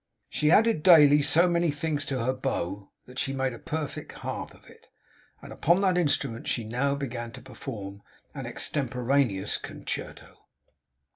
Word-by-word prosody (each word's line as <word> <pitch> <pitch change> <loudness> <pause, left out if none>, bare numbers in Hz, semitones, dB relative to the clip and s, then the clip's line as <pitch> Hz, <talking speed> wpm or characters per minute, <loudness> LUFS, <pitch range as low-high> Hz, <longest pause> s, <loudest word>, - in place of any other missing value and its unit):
She 150 - +1
added 220 -1 +4
daily 150 -4 +7
so 170 +5 +4
many 170 -1 +2
strings 145 0 -1
to 130 -4 -2
her 130 - +1
bow, 100 -7 -3 0.2
that 125 +1 -8
she 135 - 0
made 130 -1 -1
a 115 - -9
perfect 155 -2 -5
harp - - -6
of - - -21
it; - - -18 0.6
and - - -9
upon 170 +4 +2
that 190 -2 +3
instrument 145 -9 0
she 120 - -1
now 125 +6 0
began 120 -4 -5
to 130 - -9
perform 105 -7 -8 0.3
an - - -6
extemporaneous 125 -6 0
concerto. - - -7
135 Hz, 155 wpm, -27 LUFS, 120-155 Hz, 0.6 s, daily